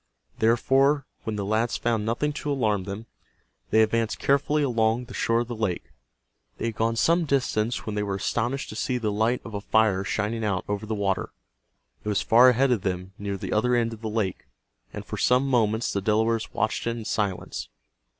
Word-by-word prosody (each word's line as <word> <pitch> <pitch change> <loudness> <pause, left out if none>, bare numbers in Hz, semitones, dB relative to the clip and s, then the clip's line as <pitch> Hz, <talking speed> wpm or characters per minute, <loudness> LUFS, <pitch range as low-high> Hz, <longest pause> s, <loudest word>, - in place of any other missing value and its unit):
Therefore, 135 +5 +3 0.2
when 110 - -2
the 100 -1 -3
lads 110 +3 0
found 115 -2 0
nothing 145 +6 0
to 145 0 -3
alarm 105 -8 0
them, 100 +3 -6 0.6
they 110 0 +5
advanced 115 0 0
carefully 145 +2 +2
along 115 -2 +1
the 120 - -11
shore 115 0 +1
of 120 - -4
the 120 - -5
lake. 110 -6 -3 0.7
They - - -3
had 115 -2 -2
gone 115 +1 0
some 170 +8 +3
distance 120 -5 0
when 110 - -3
they 105 - -1
were 100 -1 -2
astonished 120 +7 -2
to - - -7
see 125 +3 -1
the 110 -3 -1
light 110 +4 +1
of 115 - -8
a 100 - -3
fire 105 -3 +2
shining 110 +3 -2
out 100 -3 -1
over 105 +1 -3
the 110 - -2
water. 100 -2 -1 0.7
It 105 - -3
was 105 - +1
far 120 +3 +7
ahead 130 +2 +3
of 115 -5 +2
them 90 0 -3
near 100 -1 -3
the - - -4
other 125 +3 +2
end 115 -1 +1
of 110 - -11
the 110 - -3
lake, 105 -4 -2 0.4
and - - -7
for - - -6
some 125 +2 +3
moments 115 -3 +1
the 100 - -1
Delawares 110 +2 +1
watched 110 +1 -1
it 115 0 -1
in 115 - -7
silence. 100 -4 -2
110 Hz, 205 wpm, -26 LUFS, 105-120 Hz, 0.7 s, far